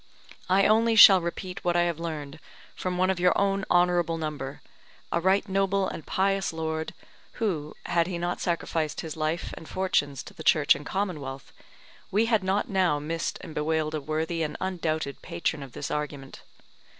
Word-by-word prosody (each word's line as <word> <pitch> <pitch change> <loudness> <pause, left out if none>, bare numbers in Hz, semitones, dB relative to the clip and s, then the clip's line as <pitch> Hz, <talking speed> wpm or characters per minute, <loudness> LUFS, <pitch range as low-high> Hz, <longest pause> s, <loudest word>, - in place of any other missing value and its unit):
I 195 +2 +4
only 225 +1 +4
shall 195 -4 +10
repeat 180 +2 -5
what 175 -1 +1
I 175 - +4
have 170 -2 -1
learned 155 -3 -5 0.4
from 180 -1 -3
one 185 +1 +3
of 185 - -3
your 180 0 +3
own 195 -1 +1
honourable 175 -2 +3
number, 150 -4 -5 0.5
a 170 - +1
right 190 +4 +2
noble 195 0 +1
and 160 - -6
pious 195 0 +1
lord, 160 -1 -3 0.4
who, 165 -10 -2
had 170 -1 +1
he 180 -2 -3
not 175 +1 -2
sacrificed 165 -3 -1
his 160 -2 -6
life 160 +2 -2
and 160 - -11
fortunes 145 -8 0
to - - -12
the - - -9
Church 150 -2 +5
and 145 +1 -8
Commonwealth, 150 -9 -4 0.6
we 215 +4 +2
had 220 -4 +2
not 195 +5 0
now 185 -7 +2
missed 165 +3 -3
and 165 - -9
bewailed 155 0 -1
a 155 - -2
worthy 160 +3 -2
and 150 -2 -2
undoubted 160 -6 -2
patron 140 - -2
of 135 -3 -9
this 145 - -5
argument. 145 -2 -5
170 Hz, 175 wpm, -27 LUFS, 155-190 Hz, 0.6 s, shall